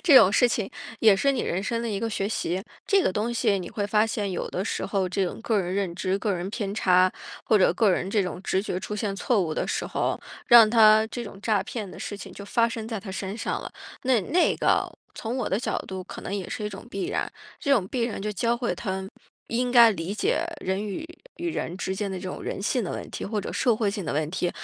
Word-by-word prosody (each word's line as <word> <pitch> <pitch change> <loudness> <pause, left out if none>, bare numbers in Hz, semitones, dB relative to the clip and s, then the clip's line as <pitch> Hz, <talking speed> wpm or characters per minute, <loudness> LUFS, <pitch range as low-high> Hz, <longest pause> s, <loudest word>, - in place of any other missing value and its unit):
这 305 -7 +8
种 205 -6 +8
事 245 +3 +5
情 215 -4 -2 0.3
也 220 -3 +7
是 275 +7 +2
你 260 - -1
人 185 +3 -1
生 230 +2 -1
的 235 - -2
一 200 -2 -2
个 230 - -1
学 200 -1 -1
习。 190 -3 -2 0.2
这 395 -2 +4
个 185 - +1
东 220 +4 -1
西 225 -4 +2
你 180 - -6
会 205 -2 -2
发 210 +2 +3
现， 210 -3 -2
有 - - -3
的 185 - -2
时 - - -2
候 195 -1 0
这 190 +1 0
种 180 - -5
个 225 -3 +1
人 180 +1 -3
认 195 -4 -1
知， 185 +2 -1
个 205 0 0
人 175 +2 -3
偏 205 -2 -3
差， 185 -2 +4 0.3
或 215 - +4
者 185 - +4
个 220 -4 +4
人 185 +1 0
这 205 -2 +2
种 180 0 -4
直 190 0 0
觉 185 -3 -3
出 210 +2 -4
现 205 -1 -2
错 220 +2 +2
误 160 -3 -2
的 - - -1
时 - - -1
候， - - -1 0.3
让 235 -2 +9
它 220 -1 +6
这 240 - -5
种 200 -2 -9
诈 210 -4 +2
骗 210 -5 -5
的 - - -10
事 205 - -5
情 195 -2 -9
就 200 - -9
发 230 +3 +2
生 225 -1 -5
在 225 -3 -3
他 190 -1 -8
身 195 +2 -4
上 - - -2
了， - - -7 0.3
那 255 -3 +3
那 325 - +2
个 - - +2 0.3
从 235 +3 -4
我 240 - -1
的 195 - +1
角 - - -1
度 190 -1 -5
可 - - -8
能 200 - -4
也 190 -3 -3
是 215 - -4
一 - - -1
种 195 -1 -9
必 195 - -3
然。 - - -2 0.3
这 280 - +1
种 205 -9 +3
必 250 +1 -1
然 230 -4 -3
就 210 - -1
教 230 +4 +1
会 240 0 -1
他 190 -3 -4 0.4
应 245 +2 0
该 235 -2 +9
理 190 -1 -3
解 215 - +1 0.2
人 190 +2 -1
与 210 +10 -4 0.3
与 345 0 -2
人 180 - -3
之 190 0 -2
间 200 0 -2
的 190 - -4
这 185 - -7
种 - - -6
人 195 - -4
性 245 +3 +1
的 - - -4
问 - - -6
题， - - -6
或 215 +1 -2
者 - - -5
社 235 -3 +2
会 215 -2 +1
性 200 0 -4
的 - - -2
问 155 +1 0
题。 180 0 -1
205 Hz, 285 characters per minute, -26 LUFS, 190-230 Hz, 0.4 s, 让